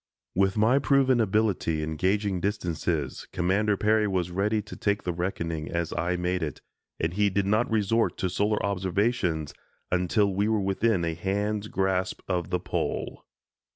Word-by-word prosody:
With 95 Hz, +2 st, +2 dB
my 115 Hz, +6 st, +4 dB
proven 130 Hz, -3 st, +3 dB
ability 100 Hz, -7 st, +1 dB
in 80 Hz, +1 st, -3 dB
gauging 95 Hz, +2 st, +1 dB
distances, 85 Hz, -, -2 dB
Commander 100 Hz, +4 st, +1 dB
Peary 105 Hz, +1 st, +3 dB
was 90 Hz, -3 st, -1 dB
ready 105 Hz, +4 st, +1 dB
to 105 Hz, -, -8 dB
take 100 Hz, 0 st, 0 dB
the 90 Hz, -, -1 dB
reckoning 85 Hz, -3 st, -3 dB
as 85 Hz, -1 st, -2 dB
I 85 Hz, +1 st, 0 dB
made 90 Hz, +1 st, -1 dB
it 75 Hz, -4 st, -3 dB, 0.4 s
and 80 Hz, +1 st, -1 dB
he 105 Hz, +1 st, +2 dB
did 100 Hz, 0 st, 0 dB
not 105 Hz, +4 st, +2 dB
resort 110 Hz, +1 st, +1 dB
to 95 Hz, -, 0 dB
solar 105 Hz, +4 st, 0 dB
observations 95 Hz, -, 0 dB, 0.4 s
until 95 Hz, +3 st, +2 dB
we 100 Hz, +2 st, +1 dB
were 110 Hz, -1 st, +2 dB
within 95 Hz, -1 st, +1 dB
a 85 Hz, -, -1 dB
hand's 100 Hz, +4 st, -2 dB
grasp 95 Hz, -2 st, -1 dB
of 90 Hz, -3 st, -1 dB
the -, -, 0 dB
Pole. -, -, -3 dB
95 Hz, 160 wpm, -27 LUFS, 90-105 Hz, 0.4 s, my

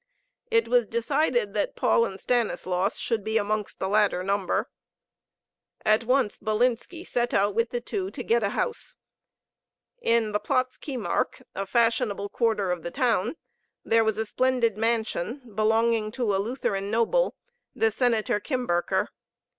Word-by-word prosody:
It 230 Hz, 0 st, +3 dB
was 240 Hz, -1 st, +3 dB
decided 240 Hz, -2 st, 0 dB
that 205 Hz, -, -1 dB
Paul 230 Hz, -, +3 dB
and 190 Hz, -, -8 dB
Stanislaus 200 Hz, -5 st, 0 dB
should 225 Hz, -3 st, -1 dB
be 220 Hz, +1 st, 0 dB
amongst 210 Hz, -1 st, -1 dB
the 190 Hz, -, -2 dB
latter 205 Hz, -2 st, +2 dB
number. 195 Hz, 0 st, 0 dB, 1.2 s
At 215 Hz, +2 st, +3 dB
once 255 Hz, -3 st, +1 dB
Bilinski 240 Hz, +9 st, -1 dB
set 240 Hz, 0 st, -1 dB
out 205 Hz, +1 st, +3 dB
with 230 Hz, +2 st, +1 dB
the 240 Hz, -, -3 dB
two 380 Hz, -, -3 dB
to 255 Hz, -, -6 dB
get 235 Hz, +1 st, +2 dB
a 200 Hz, -, +1 dB
house. 460 Hz, -, -3 dB, 1.0 s
In 230 Hz, -2 st, +2 dB
the 210 Hz, -, +1 dB
Platz 255 Hz, +4 st, -1 dB
Kiemark, 255 Hz, -7 st, -2 dB
a 195 Hz, 0 st, -4 dB
fashionable 230 Hz, -3 st, +1 dB
quarter 215 Hz, -6 st, +1 dB
of 175 Hz, -2 st, -2 dB
the 170 Hz, -, -4 dB
town, 235 Hz, -, +1 dB, 0.5 s
there 225 Hz, 0 st, +4 dB
was 220 Hz, -1 st, 0 dB
a 220 Hz, -, -1 dB
splendid 250 Hz, -1 st, +1 dB
mansion, 225 Hz, +2 st, -1 dB
belonging 220 Hz, +1 st, +2 dB
to 235 Hz, -6 st, 0 dB
a 195 Hz, -, +1 dB
Lutheran 205 Hz, -4 st, -2 dB
noble, 235 Hz, -, +2 dB, 0.4 s
the 225 Hz, 0 st, +2 dB
Senator 220 Hz, -2 st, +1 dB
Kimberker. 205 Hz, -, 0 dB
225 Hz, 145 wpm, -26 LUFS, 205-245 Hz, 1.2 s, there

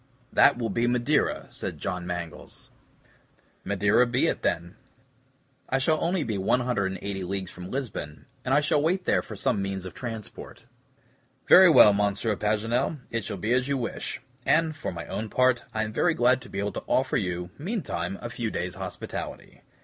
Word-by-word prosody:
"That 140 Hz, -, +6 dB
will 115 Hz, -2 st, -2 dB
be 120 Hz, +1 st, +1 dB
Madeira," 125 Hz, +5 st, +1 dB
said -, -, -5 dB
John 90 Hz, -1 st, -4 dB
Mangles. 85 Hz, -2 st, -6 dB, 0.9 s
"Madeira 105 Hz, +5 st, +3 dB
be 130 Hz, +6 st, +1 dB
it -, -, 0 dB
then. 85 Hz, +1 st, -1 dB, 0.9 s
I 135 Hz, -, +2 dB
shall 155 Hz, +4 st, +1 dB
only 175 Hz, -1 st, +1 dB
be 110 Hz, -6 st, -2 dB
180 100 Hz, -4 st, -1 dB
leagues 95 Hz, 0 st, -4 dB
from 90 Hz, 0 st, -9 dB
Lisbon, 115 Hz, -, -5 dB, 0.2 s
and 125 Hz, -, -2 dB
I 145 Hz, -, +5 dB
shall 145 Hz, 0 st, +2 dB
wait 180 Hz, +4 st, 0 dB
there -, -, +3 dB
for 110 Hz, -, -9 dB
some 100 Hz, -, 0 dB
means 95 Hz, -1 st, -3 dB
of 95 Hz, -, -7 dB
transport." 115 Hz, -2 st, -8 dB, 0.8 s
"Very 185 Hz, 0 st, +9 dB
well, 105 Hz, -9 st, +8 dB
Monsieur 105 Hz, +2 st, 0 dB
Paganel, 115 Hz, +8 st, 0 dB
it 115 Hz, -1 st, -2 dB
shall -, -, -4 dB
be 110 Hz, +6 st, 0 dB
as 130 Hz, +1 st, +2 dB
you 140 Hz, -1 st, 0 dB
wish; 120 Hz, -, -4 dB, 0.2 s
and, 160 Hz, +2 st, +2 dB
for 145 Hz, -, -4 dB
my 85 Hz, -1 st, -6 dB
own 110 Hz, +1 st, -4 dB
part, 130 Hz, 0 st, +2 dB
I 110 Hz, -, -1 dB
am 110 Hz, 0 st, -5 dB
very 170 Hz, +7 st, +2 dB
glad 125 Hz, +1 st, +3 dB
to 125 Hz, -, -12 dB
be -, -, -7 dB
able 100 Hz, +1 st, -1 dB
to -, -, -6 dB
offer 130 Hz, 0 st, +1 dB
you, 90 Hz, -2 st, -3 dB
meantime, 140 Hz, -, -3 dB
a 120 Hz, -, -5 dB
few 120 Hz, -1 st, -3 dB
days' 90 Hz, -3 st, -3 dB
hospitality. -, -, -7 dB
115 Hz, 180 wpm, -27 LUFS, 95-130 Hz, 0.9 s, Very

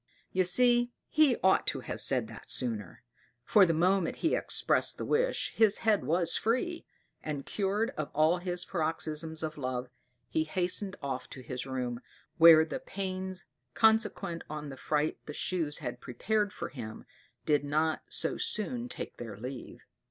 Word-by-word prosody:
You 185 Hz, 0 st, +2 dB
see 240 Hz, +5 st, +4 dB, 0.2 s
he 300 Hz, -6 st, +4 dB
ought 190 Hz, 0 st, +4 dB
to -, -, -1 dB
have -, -, -5 dB
said -, -, +3 dB
that -, -, -10 dB
sooner; 105 Hz, -8 st, -3 dB, 0.4 s
for 200 Hz, -3 st, +6 dB
the 165 Hz, -, +2 dB
moment 180 Hz, +1 st, +2 dB
he 325 Hz, -, +3 dB
expressed -, -, +1 dB
the -, -, -4 dB
wish -, -, +1 dB
his 220 Hz, -2 st, +4 dB
head 215 Hz, -2 st, +3 dB
was 170 Hz, +1 st, +2 dB
free; 255 Hz, +10 st, -1 dB, 0.3 s
and 145 Hz, -3 st, -5 dB
cured 205 Hz, +2 st, -1 dB
of 155 Hz, -1 st, -5 dB
all 160 Hz, +4 st, +3 dB
his 180 Hz, 0 st, -2 dB
paroxysms 160 Hz, -1 st, -1 dB
of 155 Hz, -1 st, -4 dB
love, 130 Hz, -1 st, -3 dB, 0.4 s
he 160 Hz, -, 0 dB
hastened 185 Hz, +3 st, 0 dB
off 130 Hz, -2 st, -4 dB
to 130 Hz, -, -9 dB
his 125 Hz, +1 st, -5 dB
room, 125 Hz, -2 st, -3 dB, 0.4 s
where 160 Hz, -1 st, +9 dB
the -, -, -5 dB
pains 190 Hz, -2 st, -5 dB, 0.3 s
consequent 210 Hz, -6 st, +2 dB
on 150 Hz, -1 st, -5 dB
the 135 Hz, -, -7 dB
fright 150 Hz, +3 st, -1 dB
the 150 Hz, -, -6 dB
Shoes 165 Hz, -5 st, 0 dB
had -, -, -6 dB
prepared 205 Hz, -, -1 dB
for -, -, -6 dB
him, 115 Hz, -5 st, -8 dB, 0.4 s
did 145 Hz, -1 st, +2 dB
not 155 Hz, +2 st, 0 dB
so 160 Hz, -, +1 dB
soon 240 Hz, +3 st, -2 dB
take -, -, -7 dB
their 110 Hz, -4 st, -7 dB
leave. 125 Hz, +3 st, -8 dB
165 Hz, 160 wpm, -30 LUFS, 145-200 Hz, 0.4 s, where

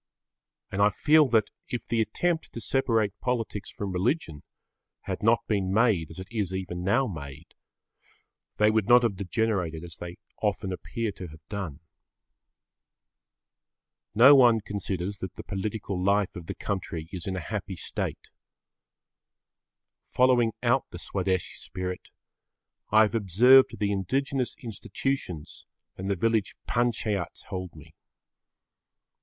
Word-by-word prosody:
And 100 Hz, -, -1 dB
I 105 Hz, -, +6 dB
feel 150 Hz, +8 st, +4 dB
that, 110 Hz, -4 st, +2 dB, 0.2 s
if 120 Hz, -, -4 dB
the 115 Hz, -1 st, +1 dB
attempt 160 Hz, +10 st, -1 dB
to -, -, -5 dB
separate 115 Hz, -4 st, +1 dB
politics 115 Hz, -5 st, -2 dB
from 100 Hz, -2 st, -5 dB
religion 90 Hz, -, -1 dB, 0.6 s
had -, -, -4 dB
not 115 Hz, +2 st, +3 dB
been 100 Hz, -3 st, 0 dB
made 100 Hz, -7 st, +3 dB
as 80 Hz, -, -11 dB
it 95 Hz, 0 st, -7 dB
is 100 Hz, -5 st, -2 dB
even 90 Hz, -2 st, -4 dB
now 115 Hz, +9 st, +3 dB
made, 75 Hz, -, -8 dB, 1.0 s
they 105 Hz, 0 st, +5 dB
would 110 Hz, -2 st, +1 dB
not 120 Hz, 0 st, +7 dB
have 115 Hz, -4 st, +1 dB
degenerated 95 Hz, -5 st, -1 dB
as 85 Hz, -3 st, -9 dB
they 85 Hz, 0 st, -7 dB, 0.2 s
often 100 Hz, -2 st, -1 dB
appear 115 Hz, +4 st, -3 dB
to 95 Hz, -2 st, -8 dB
have 80 Hz, 0 st, -15 dB
done. 95 Hz, -10 st, -5 dB, 2.3 s
No 130 Hz, +6 st, +9 dB
one 120 Hz, -5 st, +6 dB
considers 100 Hz, -1 st, -4 dB
that 95 Hz, -1 st, -6 dB
the -, -, -8 dB
political 100 Hz, -1 st, -3 dB
life 100 Hz, 0 st, +2 dB
of 85 Hz, -2 st, -8 dB
the -, -, -4 dB
country 85 Hz, -5 st, -4 dB
is 90 Hz, -2 st, -6 dB
in 95 Hz, -, -2 dB
a -, -, -2 dB
happy -, -, -3 dB
state. -, -, -4 dB, 1.7 s
Following 125 Hz, -3 st, +3 dB
out -, -, +3 dB
the -, -, -8 dB
Swadeshi 95 Hz, -2 st, -2 dB
spirit, 90 Hz, -1 st, -6 dB, 0.8 s
I 110 Hz, +1 st, +6 dB
observe 115 Hz, +5 st, +6 dB
the 100 Hz, -1 st, 0 dB
indigenous 130 Hz, +7 st, -1 dB
institutions 110 Hz, -, -4 dB, 0.3 s
and 95 Hz, +1 st, -5 dB
the 100 Hz, -, +2 dB
village 110 Hz, +2 st, 0 dB
panchayats 115 Hz, -6 st, -1 dB
hold 90 Hz, -3 st, -5 dB
me. 80 Hz, +1 st, -14 dB
100 Hz, 135 wpm, -27 LUFS, 90-115 Hz, 2.3 s, No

